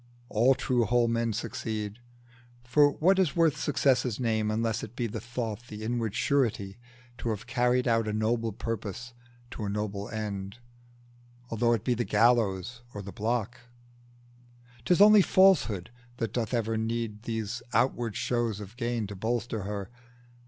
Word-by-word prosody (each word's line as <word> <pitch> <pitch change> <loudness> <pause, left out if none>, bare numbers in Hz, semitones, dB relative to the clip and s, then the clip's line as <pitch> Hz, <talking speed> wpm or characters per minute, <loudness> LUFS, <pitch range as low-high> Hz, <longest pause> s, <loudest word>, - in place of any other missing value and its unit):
All 125 +5 +4
true, 125 -3 +1
whole 120 +2 +3
men 115 0 0
succeed: 110 -1 -4 0.6
for 145 +4 +4
what 190 +4 +3
is 180 -7 +2
worth 165 -3 +3
Success's 130 -5 +1
name, 110 -3 0
unless 110 +1 0
it 115 +1 -8
be 120 - -1
the 110 0 -4
thought, 120 -1 -5
The 105 0 -8
inward 115 -2 -2
surety, 115 -7 0 0.4
to 115 - -2
have 110 0 -3
carried 125 +1 +1
out 115 -2 +2
A - - 0
noble 115 +1 0
purpose 115 +3 -5 0.4
to 110 - -6
a - - -2
noble 100 -1 -3
end, 100 -2 -5 0.9
Although 120 +1 +2
it 110 -3 -1
be 125 - +2
the 120 0 -1
gallows 115 -1 +2
or 100 - -5
the 100 - -7
block? 120 +2 -2 1.3
'Tis 180 +2 +3
only 210 0 +9
Falsehood 160 - +3 0.3
that 115 -2 -3
doth 115 -3 -1
ever 115 -2 0
need 110 -1 -2
These 110 0 -3
outward 120 -4 +1
shows 120 -4 -1
of 105 +2 -9
gain 120 -3 -1
to 100 0 -7
bolster 110 0 -2
her. 100 0 -5
115 Hz, 155 wpm, -28 LUFS, 105-120 Hz, 1.3 s, only